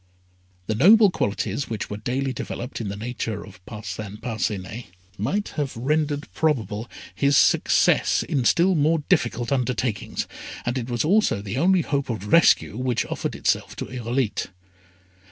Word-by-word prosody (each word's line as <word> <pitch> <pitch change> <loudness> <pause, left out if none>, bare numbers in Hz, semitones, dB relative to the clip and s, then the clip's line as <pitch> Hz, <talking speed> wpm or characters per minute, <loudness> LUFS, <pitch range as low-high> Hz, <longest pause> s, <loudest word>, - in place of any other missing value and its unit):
The 110 - -1
noble 200 - +6
qualities 105 - -2
which 110 -2 -4
were 105 - -3
daily 130 +5 -2
developed 120 +1 -5
in 110 - -4
the 100 - -4
nature 110 -1 -4
of 95 -3 -15
Parcin 105 -2 -6
Parcinet, 110 -2 -3 0.3
might 195 - -1
have 145 -6 -4
rendered 145 +3 0
probable 120 -7 -1 0.2
his 140 0 +3
success - - +3
in 135 -4 -1
still 180 +8 +4
more 155 0 +2
difficult 120 0 +1
undertakings, 125 -4 -1 0.4
and 120 - -1
it 120 0 -6
was 120 +3 0
also 205 - +3
the 100 +5 -4
only 185 +3 +4
hope 140 -4 -2
of 105 -3 -4
rescue 170 -9 +5
which 125 -2 0
offered - - -4
itself - - 0
to - - -5
Irolite. 120 -1 -2
125 Hz, 150 wpm, -24 LUFS, 110-145 Hz, 0.4 s, noble